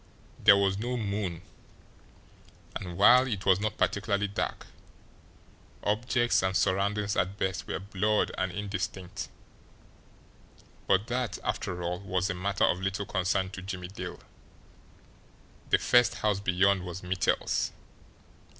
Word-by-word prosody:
There 100 - +8
was 100 0 +1
no 125 +3 -2
moon, 100 -6 -3 1.3
and, 90 -2 -5
while 125 +6 +7
it 105 -5 -3
was 95 -1 +5
not 110 +1 -2
particularly 100 0 +1
dark, 100 - -3 1.2
objects 120 +3 +2
and 95 +1 +1
surroundings 100 +2 +1
at 95 +3 0
best 95 -3 -2
were - - -2
blurred 100 +3 0
and 95 -1 -1
indistinct; 95 0 -4 1.6
but 95 +2 +3
that, 125 0 -2
after 90 0 -3
all, 90 +1 -2
was 95 0 -1
a - - -1
matter 95 +2 -1
of 90 - +1
little 95 +1 -2
concern 95 0 0
to 95 - -7
Jimmie 90 -1 -6
Dale 95 - -7 1.5
the - - +5
first 120 0 +4
house 105 -2 0
beyond 100 0 +2
was 90 +1 -7
Mittel's. 90 0 0
100 Hz, 125 wpm, -29 LUFS, 95-105 Hz, 1.6 s, There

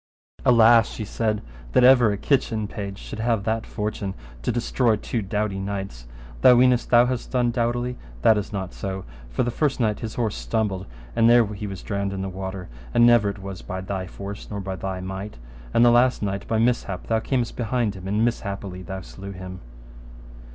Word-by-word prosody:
Alas, 115 -2 +6
she 110 - -5
said, 110 0 -1 0.3
that - - +5
ever 125 -4 +7
a 100 - -2
kitchen 115 -4 0
page 100 -2 -6
should - - -8
have 115 -2 +1
that 110 +1 -1
fortune 105 -2 -3 0.3
to - - 0
destroy 120 0 +1
such 105 - -10
two 115 - -1
doughty 105 0 -2
knights: 95 -11 -5 0.3
thou 125 - +8
weenest 125 0 +4
thou 120 0 +6
hast 125 -1 -3
done 125 -2 +1
doughtily, 120 +1 -1 0.2
that 110 - +6
is 105 +1 -3
not 95 -3 -4
so; 95 -1 -5 0.2
for - - 0
the 120 - -1
first 140 +2 0
knight 110 -3 +1
his 110 -2 -5
horse 115 -4 -1
stumbled, 95 - -2 0.3
and 115 - +5
there 120 -1 +6
he 105 +1 -5
was 95 -2 -7
drowned 100 -1 -2
in 95 0 -3
the 95 - -3
water, 95 0 -6 0.3
and 120 - +7
never 120 -4 +5
it 100 -1 -7
was 95 -2 -6
by 95 - -5
thy 95 0 -4
force, 100 +2 -8
nor 105 - -4
by 95 -1 -4
thy 95 -1 -4
might. 95 0 -6 0.3
And 120 - +5
the 120 - +7
last 125 -1 +3
knight 100 -1 -3
by 110 - 0
mishap 115 -5 0
thou 110 -1 +1
camest 120 +1 -1
behind 120 -2 0
him 95 -1 -8
and 105 +3 +2
mishappily 100 -5 -3
thou 95 +1 -6
slew 100 +2 -9
him. 95 0 -8
105 Hz, 200 wpm, -24 LUFS, 95-120 Hz, 0.3 s, thou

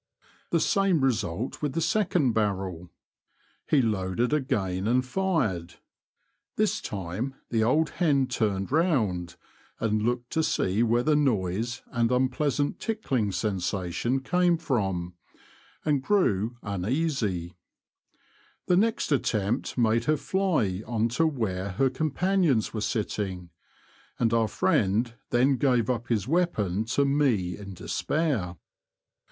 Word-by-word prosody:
The - - +2
same 195 -6 +2
result 110 -3 -1
with 145 -3 -1
the 165 - -1
second 175 - +2
barrel. 95 -5 -2 0.8
He 140 -4 +4
loaded 105 +3 0
again 100 -9 0
and 125 +2 +2
fired. 125 - -1 0.8
This - - +1
time 100 +7 -4 0.2
the 115 -2 +2
old 150 +7 +2
hen 145 -6 +2
turned 100 -5 -1
round, 110 - +1 0.4
and 110 -1 0
looked 120 +2 -1
to 160 - +1
see 100 -8 +1
where 120 +1 +2
the 155 +1 +3
noise 115 -3 0
and 120 -1 +1
unpleasant 135 +3 0
tickling 135 - -1
sensation 95 +5 -1
came 175 +4 +2
from, 95 - -1 0.7
and 145 -3 +2
grew 120 - +1
un 100 -3 -3
easy; 110 - -1 1.1
the 180 - +3
next 225 -3 +1
attempt 115 -3 0
made 115 -1 +2
her 155 +2 +2
fly 155 - 0
on 115 -1 0
to 145 +8 +2
where 100 -9 -2
her 130 +7 +2
companions 155 - +1
were 110 - -3
sitting, 95 -5 -3 0.7
and 115 -2 +1
our 115 -1 +3
friend 105 +4 +1 0.2
then 130 +3 +3
gave 125 -2 +2
up 120 -1 -3
his 110 -3 0
weapon 110 - 0
to 135 +5 +1
me 130 -11 +1
in 100 -2 -9
despair. 115 - -1
120 Hz, 125 wpm, -27 LUFS, 100-145 Hz, 1.1 s, He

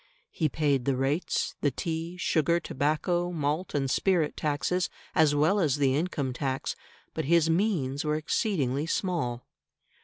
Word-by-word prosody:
He 155 -3 0
paid 140 -3 +1
the 135 - +2
rates, 135 +6 -1
the 145 - +3
tea, 165 +5 -4
sugar, 170 -1 +2
tobacco, 170 +4 0
malt, 155 +1 -2
and 135 -1 +1
spirit 165 +2 +1
taxes, 155 +4 0 0.2
as 155 -2 +4
well 160 +8 +3
as 150 -7 +2
the 135 -2 +2
income 145 -5 -1
tax, 135 0 -2 0.4
but - - -3
his 165 +1 +4
means 160 -7 0
were 150 0 0
exceedingly 155 - 0
small. 150 -11 -1
155 Hz, 145 wpm, -28 LUFS, 140-170 Hz, 0.4 s, as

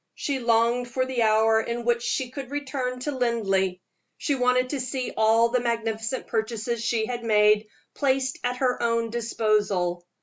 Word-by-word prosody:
She 280 -2 -2
longed 235 +1 +2
for 255 +1 0
the 260 -2 -2
hour 220 0 +4
in 235 +1 -4
which 240 0 +2
she 245 +1 -2
should 265 -1 -7
return 260 -3 -3
to 295 - -2
Linleigh; 210 -8 0 0.4
she 290 - -1
wanted 255 -1 +2
to 285 - -2
see 255 0 -3
all 225 +1 +4
the 250 +1 +1
magnificent 230 0 -2
purchases 225 +1 -2
she 230 -1 0
had 240 0 -4
made 210 -1 +4 0.3
placed 265 -2 0
at 245 0 -1
her 250 -1 0
own 230 -1 0
disposal. 210 -6 0
235 Hz, 165 wpm, -25 LUFS, 220-255 Hz, 0.4 s, hour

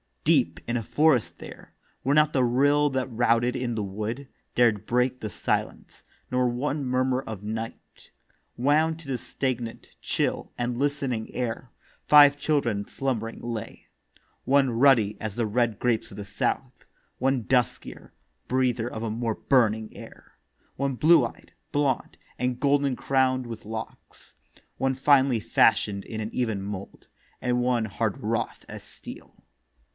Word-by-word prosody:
Deep - - +2
in 120 +1 0
a 115 - -3
forest 150 0 +2
there, - - -12 0.3
Where 140 +3 +2
not 150 0 +4
the 130 - +3
rill 145 +4 +3
that 130 -1 -1
routed 120 +1 +1
in 120 -2 -2
the 110 - -2
wood 110 +7 -4 0.3
Dared 110 -4 +3
break 125 +2 +1
the 110 - -4
silence, - - -3 0.3
nor 125 0 +2
one 140 +4 -2
murmur 130 0 +1
of 110 -6 -8
night 110 +2 -7 0.5
Wound 155 +5 +2
to 160 - -13
the 130 -2 -1
stagnant, 120 -3 -4
chill, - - -2
and 120 0 -2
listening 135 -5 -1
air, 120 0 -3 0.4
Five 145 -1 +8
children 120 -10 0
slumbering 115 -4 -3
lay. 115 -2 -6 0.6
One 135 -1 +3
ruddy 115 -4 +4
as 110 -2 -5
the 120 - 0
red 115 0 0
grapes 120 -3 0
of 100 - -11
the 100 - -6
south; 110 +5 -3 0.3
One 130 -1 +1
duskier, 125 +1 -1 0.4
breather 125 -2 0
of 110 - -5
more 115 0 -2
burning 110 -5 +1
air; - - -13 0.4
One 135 -1 -1
blue 165 +6 +5
eyed, - - -10 0.2
blond, 145 -4 0 0.2
and 125 0 -1
golden 140 -1 +2
crown'd 130 -1 +1
with 115 -2 -8
locks; 110 +1 -8 0.4
One 135 0 0
finely 135 -2 +4
fashion'd 105 -2 +2
in 110 -1 -5
an 105 - -3
even 110 -5 -1
mould; 100 0 -7 0.3
And 125 0 0
one 120 -2 +1
hard 110 +3 -2
wrought 115 -1 -3
as - - -9
steel. - - -11
125 Hz, 145 wpm, -26 LUFS, 110-135 Hz, 0.6 s, Five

